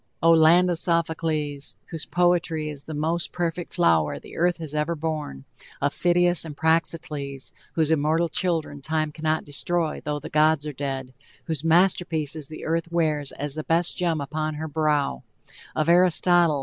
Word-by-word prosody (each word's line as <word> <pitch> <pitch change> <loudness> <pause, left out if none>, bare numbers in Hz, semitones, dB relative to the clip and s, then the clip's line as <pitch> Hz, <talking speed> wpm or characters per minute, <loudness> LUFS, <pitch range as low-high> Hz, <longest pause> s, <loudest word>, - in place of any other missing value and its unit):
Oh, 165 - +6
land 165 +3 +6
of 170 - 0
Sophocles! 160 -4 -1 0.2
whose 165 -2 -5
poetry 175 -3 +1
is 140 -1 -10
the 155 - -6
most 165 +3 -1
perfect 175 0 -3
flower 80 -3 +3
the - - -12
earth 175 +1 +1
has 160 -3 -7
ever 150 +2 0
borne, 150 - -4 0.3
of 140 0 0
Phidias 175 -1 +3
and 150 -3 -8
Praxiteles! 155 -4 -1 0.2
whose 160 -1 +1
immortal 160 +2 +2
children 160 -4 -1
time 155 +1 -1
cannot 155 +1 -1
destroy, 160 +3 -1
though 150 0 -2
the - - -8
gods 155 0 +3
are 150 - -4
dead 135 -1 -4 0.3
whose 160 -4 -3
masterpieces 160 -3 +1
the 155 - -8
earth 165 +1 -1
wears 155 -4 0
as 145 -1 -5
the 155 +1 -4
best 165 +2 +1
gem 170 -3 0
upon 155 +2 -3
her 160 +1 -4
brow, 150 - 0 0.5
of 155 0 0
Aristotle! 175 -2 +4
160 Hz, 160 wpm, -24 LUFS, 150-170 Hz, 0.5 s, Oh